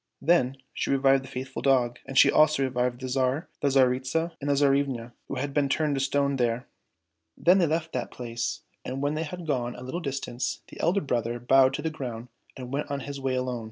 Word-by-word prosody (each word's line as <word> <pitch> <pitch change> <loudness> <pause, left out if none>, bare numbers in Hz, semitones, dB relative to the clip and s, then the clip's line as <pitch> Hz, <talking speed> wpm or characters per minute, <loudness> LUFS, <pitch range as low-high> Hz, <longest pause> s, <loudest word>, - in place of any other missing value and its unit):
Then 135 -4 +2 0.2
she - - -2
revived 135 0 +4
the - - -10
faithful 130 +1 -6
dog, 125 -3 +2
and 135 - -4
she - - +7
also 155 -2 +4
revived 125 -1 -1
the 130 - -3
Tsar 130 +1 +1
and 160 - -9 0.2
the 145 - +2
Tsaritsa 130 +6 +1
and 145 - -2
the 140 - +3
Tsarivna, 135 -4 +1 0.2
who - - -4
had 140 +2 -3
been 145 -1 +2
turned 150 +1 +1
to 135 - 0
stone 140 0 +1
there. 120 -1 0 0.7
Then 180 +3 +5
they 170 - +3
left 160 +1 -1
that 125 - -2
place 115 -2 -4 0.2
and 130 +2 -4
when 145 +1 +1
they 155 - -2
had 170 +2 -6
gone 125 -5 -1
a 125 - -9
little 150 +8 -4
distance, 135 -4 -3
the - - -12
elder 180 +5 +2
brother 120 -4 -1
bowed 130 +2 +4
to 150 - -5
the 160 - -1
ground 125 -5 -6 0.3
and 125 0 -7
went 145 +1 -2
on 140 -1 -2
his 140 +1 -6
way 130 -1 0
alone. 125 -1 -2
135 Hz, 225 wpm, -27 LUFS, 125-145 Hz, 0.7 s, she